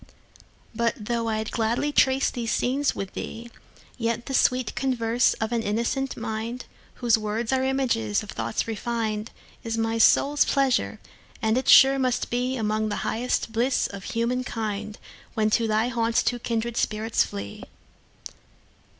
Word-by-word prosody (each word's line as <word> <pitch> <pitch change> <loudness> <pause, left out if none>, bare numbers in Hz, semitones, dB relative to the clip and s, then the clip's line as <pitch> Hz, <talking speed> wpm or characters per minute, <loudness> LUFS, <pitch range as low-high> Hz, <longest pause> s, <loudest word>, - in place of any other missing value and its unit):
But 230 +1 0
though 230 +2 -2
I'll 220 0 -1
gladly 230 +6 0
trace 265 -1 +3
these 235 -2 -3
scenes 275 +3 +1
with 195 -1 -5
thee, 235 +1 -7 0.5
Yet 230 0 -1
the 270 - -5
sweet 255 -2 +2
converse 240 -3 +1
of 220 0 -3
an 235 -1 +1
innocent 235 +5 -1
mind, 225 +2 -4 0.3
Whose 235 -3 +2
words 220 +3 -2
are 260 0 +2
images 255 - 0
of - - -8
thoughts 115 - -2
refin'd, 225 -1 -2 0.3
Is 230 0 -3
my 225 0 0
soul's 285 +5 +5
pleasure; 245 - +1 0.4
and 220 0 +1
it 255 - -1
sure 270 0 +8
must 255 -2 0
beAlmost 225 -4 0
the 205 - -2
highest 235 0 -1
bliss 240 +4 +1
of 200 -1 -7
human 240 +2 -1
kind, 215 -3 -4 0.4
When 215 -1 +1
to 230 +1 +2
thy 220 +2 +1
haunts 230 -1 +1
two 245 - 0
kindred 230 0 -2
spirits 220 +1 +1
flee. 100 0 -7
230 Hz, 150 wpm, -25 LUFS, 220-250 Hz, 0.5 s, sure